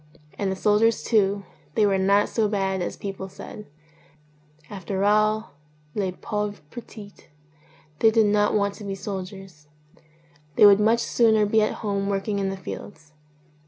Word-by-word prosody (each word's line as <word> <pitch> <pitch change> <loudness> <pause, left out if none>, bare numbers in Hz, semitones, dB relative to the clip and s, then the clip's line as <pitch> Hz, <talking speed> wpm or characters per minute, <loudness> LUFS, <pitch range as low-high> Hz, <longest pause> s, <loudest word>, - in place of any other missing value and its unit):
And 195 -2 -2
the - - -2
soldiers 210 +4 +2
too, 200 -3 +1 0.3
they 215 - +4
were 195 -1 +2
not 200 +2 +3
so 220 -2 0
bad 195 -2 -1
as 175 - -4
people 195 -1 -6
said; 210 +2 -10 1.0
after 195 0 -4
all 215 0 +2 0.4
les 195 -3 -1
pawores 210 +2 -4
petits, 215 -4 -11 0.7
they 225 - +6
did 220 0 +3
not 205 0 +2
want 200 -1 +1
to 210 - -11
be 195 -1 -4
soldiers; 190 -5 -8 0.9
they - - +7
would 200 0 +7
much 225 +2 +3
sooner 220 -3 +3
be 220 +1 +2
at 215 - +1
home 200 -1 -1
working 200 +1 -1
in 195 -1 -1
the 195 - -5
fields. 155 -4 -9
205 Hz, 155 wpm, -24 LUFS, 195-215 Hz, 1.0 s, they